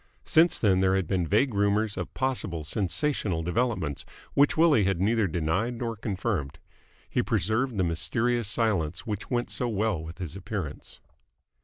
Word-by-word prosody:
Since 165 +2 +4
then 95 -4 +3
there 95 0 +3
had 95 -2 +1
been 90 0 0
vague 115 - +2
rumours 105 +1 +1
of - - -5
possible 110 -11 -1
sensational 95 - -1
developments, 90 - -1 0.3
which 145 +2 +3
Willie 155 - +5
had 95 -3 0
neither 110 +2 +2
denied 90 +8 -1
nor 115 -1 -3
confirmed. 100 - -3 0.5
He - - 0
preserved 110 +4 0
the 95 - +2
mysterious 100 +8 0
silence 95 -7 0
which 105 -2 -4
went 120 -1 -1
so 125 - -1
well 105 -6 0
with 80 +1 -9
his 90 -2 -6
appearance. 95 -5 -6
100 Hz, 155 wpm, -27 LUFS, 90-115 Hz, 0.5 s, Willie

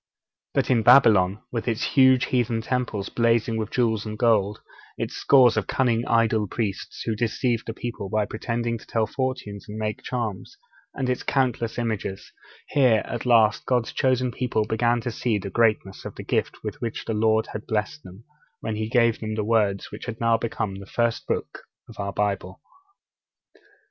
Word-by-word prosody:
But - - +1
in 120 -3 +4
Babylon, 105 -5 +5
with 115 -1 -3
its 115 0 0
huge 130 -2 +5
heathen 120 -3 0
temples 115 -5 -2
blazing 115 -1 +1
with 110 -1 -2
jewels 115 -4 +1
and 110 -1 -6
gold, 105 -3 +2 0.4
its - - -3
scores 125 -5 +5
of 105 - 0
cunning 120 -3 +1
idol 115 -2 +2
priests, 100 -2 -4
who 110 - -1
deceived 115 +1 -1
the 115 - -3
people 120 -6 -5
by 110 -1 +1
pretending 115 +2 -3
to - - -17
tell 115 -1 +1
fortunes 125 -6 -4
and 105 - -6
make 110 -1 -3
charms, 120 - -4 0.4
and 130 - -2
its 125 0 -1
countless 125 -4 0
images, 110 -5 -3 0.4
here, 125 -6 +3
at 120 +1 -5
last, 115 -2 +4
God's 125 -3 +1
chosen 130 -1 +1
people 115 -3 -1
began 120 +2 +1
to 120 - -3
see 115 -1 -1
the 100 0 -6
greatness 110 -4 +1
of - - -7
the - - -7
gift - - -2
with - - -6
which 115 -2 -4
the 115 - -2
Lord 110 +1 +2
had 105 - -6
blessed 105 -9 -2
them, 95 +4 -13 0.4
when 110 -1 -4
He 110 0 -3
gave 115 -1 +3
them 110 -1 -4
the 110 - -1
words 105 -3 +1
which - - -8
have 115 -2 -5
now 115 -1 +3
become 110 -3 -2
the 100 - -11
first 120 +1 -1
books - - -3 0.3
of - - -14
our 100 0 -2
Bible. 100 -2 -2
115 Hz, 180 wpm, -24 LUFS, 105-120 Hz, 0.4 s, Babylon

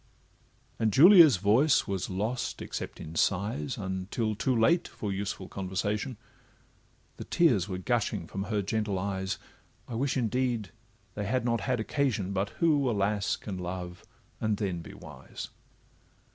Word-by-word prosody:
And 110 -1 +2
Julia's 160 - +8
voice 115 - +4
was 95 -2 -3
lost, 110 +6 -2
except - - -6
in 80 - -8
sighs, 95 -2 0
Until 95 +3 -2
too 120 +5 0
late 170 +10 +3
for 105 - -5
useful 100 -1 -4
conversation; 100 +6 -3 1.0
The - - -6
tears 120 - +2
were 90 - -3
gushing 105 -3 -1
from 95 +4 -5
her 105 -2 -1
gentle 105 -1 -1
eyes, 95 0 -2 0.5
I - - -7
wish 135 +4 0
indeed 120 -3 0 0.4
they 105 +1 -4
had 120 +3 0
not 115 -1 +1
had 125 -2 0
occasion, 110 -5 -1
But 100 +1 0
who, 145 -5 +3
alas! 100 -2 0
can 95 -4 -6
love, 90 0 -6 0.4
and 110 -2 0
then 95 -5 -2
be - - -11
wise? - - -9
105 Hz, 145 wpm, -29 LUFS, 95-120 Hz, 1.0 s, Julia's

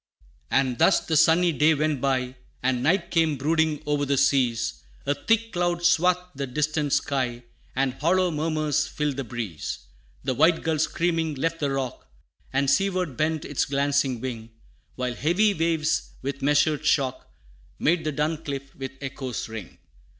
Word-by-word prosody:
IX. - - -34
"And 130 -3 +1
thus 195 - +5
the 160 - -2
sunny 165 +3 +5
day 155 0 +3
went 150 -2 0
by, 130 -2 0 0.3
And 130 -1 +1
night 170 +5 +1
came 160 -3 +2
brooding 155 +1 +1
o'er 145 -1 0
the 140 0 +1
seas; 130 -4 +1 0.2
A 145 - +2
thick 225 +9 0
cloud 175 -1 0
swathed 180 +2 +4
the 140 0 -4
distant 150 +2 -1
sky, 130 -4 0 0.3
And 135 0 +1
hollow 180 +5 +2
murmurs 155 -1 0
filled 150 -3 -2
the 135 - -2
breeze. 110 -9 -5 0.4
The 130 - 0
white 160 +6 +3
gull 160 -1 0
screaming, 165 -1 0
left 165 +4 -1
the 145 - 0
rock, 135 -2 -4 0.4
And 140 +1 +1
seaward 180 0 +1
bent 155 +2 -1
its 145 - 0
glancing 140 -2 +1
wing, 115 -3 -5 0.5
While 125 -1 -2
heavy 180 - +2
waves, 165 -2 0
with 140 +1 -4
measured 150 +2 +2
shock, 135 -4 0 0.5
Made 165 +1 +2
the 155 - -1
dun 150 +2 -1
cliff 140 -1 -5
with 135 -1 -6
echoes 135 -2 -4
ring. 110 -5 -8
145 Hz, 160 wpm, -25 LUFS, 135-160 Hz, 0.5 s, thus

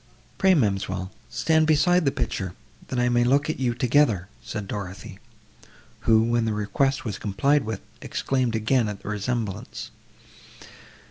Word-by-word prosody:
"Pray, 190 -1 +5
ma'amselle, 95 - 0 0.2
stand 160 -1 +2
beside 165 +3 +4
the 140 - +3
picture, 95 -8 -3 0.3
that 130 - -4
I 125 0 +2
may 120 0 +3
look 140 +5 +3
at - - -7
you 120 -3 0
together," 120 -7 +2
said 110 -3 -5
Dorothée, 100 -1 -6 0.9
who, 110 0 +6
when 120 0 +1
the 110 - 0
request 135 +7 0
was 105 -3 -4
complied 135 +7 +1
with, 110 -3 -4 0.2
exclaimed 130 -4 -1
again 110 +1 +2
at 100 -1 -7
the - - -5
resemblance. 105 -1 -3
115 Hz, 145 wpm, -25 LUFS, 105-135 Hz, 0.9 s, who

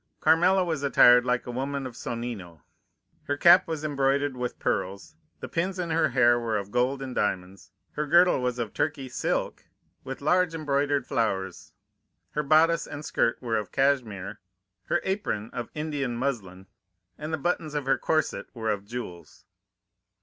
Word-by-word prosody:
Carmela 180 +4 +4
was 160 -5 -2
attired 125 -3 +6
like 125 0 0
a 125 - -5
woman 135 +2 -3
of 130 - -6
Sonnino. 115 -11 -6 0.6
Her 145 - -1
cap 175 +4 +6
was 160 -2 -4
embroidered 140 -1 0
with 125 -1 -4
pearls, 100 - -3 0.3
the - - -5
pins 185 +3 -2
in 175 -2 -3
her 165 +1 +2
hair 120 -1 +4
were 115 -2 -1
of 100 0 -6
gold 130 +4 0
and 130 -1 -6
diamonds, 95 -2 -3 0.2
her 150 0 -3
girdle 175 -2 +5
was 125 -1 -1
of 115 -3 -4
Turkey 140 -3 -2
silk, 125 - -2 0.4
with 135 0 -6
large 175 +3 +2
embroidered 145 -2 0
flowers, 95 -5 -2 0.6
her 150 - -1
bodice 155 +3 +3
and 145 +1 -7
skirt 115 - 0
were 115 -2 0
of 105 -2 -4
cashmere, 110 -8 0 0.5
her - - 0
apron 190 - -2
of 120 -2 -5
Indian 145 -5 -2
muslin, 100 -9 -3 0.5
and 155 +1 -5
the 160 - 0
buttons 155 -1 -2
of 145 -2 -2
her 135 - +2
corset 155 -1 -1
were 110 -2 -1
of 100 -1 -4
jewels. 90 -9 -8
135 Hz, 165 wpm, -27 LUFS, 115-155 Hz, 0.6 s, attired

